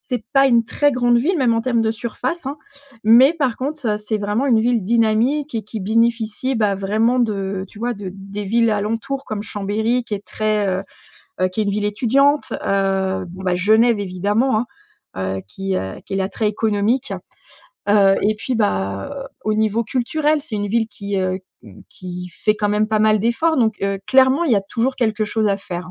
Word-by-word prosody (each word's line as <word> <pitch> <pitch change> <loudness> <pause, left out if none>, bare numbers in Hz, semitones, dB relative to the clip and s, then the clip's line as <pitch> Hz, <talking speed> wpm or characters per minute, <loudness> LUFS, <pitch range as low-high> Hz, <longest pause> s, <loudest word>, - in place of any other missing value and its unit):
C'est 245 -4 -4
pas 275 0 +6
une 235 -2 +4
très 290 +5 +1
grande 245 -1 +3
ville 330 +9 +1
même 245 -4 +3
en 230 - +1
termes 235 -1 +1
de 220 - +1
surface, 250 +8 -4
hein 280 +2 -3 0.5
mais 240 +7 +7
par 270 -7 0
contre, 285 0 -4
heu, 210 -1 +1
c'est 215 +1 -2
vraiment 210 +6 -1
une 240 -5 +4
ville 235 -1 +1
dynamique 235 +7 +1
et 225 - -1
qui 220 +2 -6
bénéficie, 230 +4 0
bah, 210 -3 +2
vraiment 215 +6 +1
de, 225 -3 +1 0.3
heu, - - -8
tu 205 - -15
vois? 240 +2 -2
De, 200 -3 -7
des 195 +1 -7
villes 230 +3 +2
alentour 225 +7 -2
comme 215 -5 -4
Chambéry 220 +4 -1
qui 215 - -4
est 200 0 -7
très, 215 -1 0
heu 185 0 -1 0.6
heu, 185 - +3
qui 185 +4 -2
est - - +2
une - - 0
ville 205 +1 -1
étudiante. 270 +7 +2
Heu, 190 -1 0
bon, 185 +2 -10
ben, 180 -1 +1
Genève 220 +4 +3
évidemment, 205 +6 0
hein, 240 - -3 0.7
heu, - - -5
qui, 195 - -3
heu, 95 0 -5
qui 200 - -7
est - - 0
l'attrait 195 +3 -1
économique. 215 +3 0 0.8
Heu, 200 -1 +5
et 215 +2 +2
puis, 250 +4 -3
bah, 100 - -2 0.2
au 215 - +1
niveau 220 +1 +1
culturel 295 +6 0
c'est 240 -8 -5
une 205 0 -2
ville 225 +1 +1
qui, 200 -2 -4
heu, 185 0 -1 0.5
qui 180 0 -7
fait 215 - +1
quand 210 -1 0
même 210 +1 +1
pas 220 -1 +1
mal 215 0 +4
d'efforts 240 +9 +1
donc, 220 -3 +2
heu, 195 0 0
clairement 265 +4 +4
il 290 - +2
y - - +5
a 200 - 0
toujours 235 +6 -1
quelque 220 -3 0
chose 215 0 0
à 200 - +1
faire. 180 -2 -6
220 Hz, 205 wpm, -20 LUFS, 200-245 Hz, 0.8 s, mais